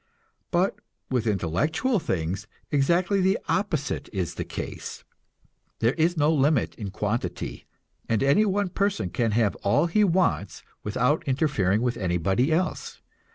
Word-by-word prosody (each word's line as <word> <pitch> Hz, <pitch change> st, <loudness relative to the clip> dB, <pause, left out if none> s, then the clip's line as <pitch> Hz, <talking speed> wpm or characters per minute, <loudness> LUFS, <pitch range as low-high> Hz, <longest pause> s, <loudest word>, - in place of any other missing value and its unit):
But 180 Hz, +2 st, +1 dB, 0.3 s
with 120 Hz, -3 st, 0 dB
intellectual 140 Hz, -, +1 dB
things 90 Hz, -, -2 dB, 0.2 s
exactly 175 Hz, +7 st, +2 dB
the 190 Hz, +1 st, +3 dB
opposite 180 Hz, -8 st, -1 dB
is 95 Hz, -5 st, -2 dB
the -, -, -4 dB
case. -, -, -6 dB, 0.7 s
There 115 Hz, +3 st, +2 dB
is 170 Hz, +2 st, +1 dB
no 150 Hz, +2 st, +3 dB
limit 145 Hz, -3 st, +2 dB
in 105 Hz, -3 st, -6 dB
quantity, 105 Hz, -2 st, -3 dB, 0.4 s
and 115 Hz, +2 st, +2 dB
any 140 Hz, +10 st, +4 dB
one 200 Hz, -1 st, 0 dB
person 195 Hz, -, -1 dB
can 115 Hz, +3 st, +1 dB
have 110 Hz, -2 st, +2 dB
all 100 Hz, +11 st, +2 dB
he 210 Hz, +5 st, +3 dB
wants 175 Hz, -, +1 dB, 0.2 s
without 125 Hz, +8 st, +1 dB
interfering 125 Hz, -, +1 dB
with 125 Hz, -1 st, 0 dB
anybody 95 Hz, -, +1 dB
else. 180 Hz, +3 st, -1 dB
135 Hz, 135 wpm, -26 LUFS, 105-175 Hz, 0.7 s, any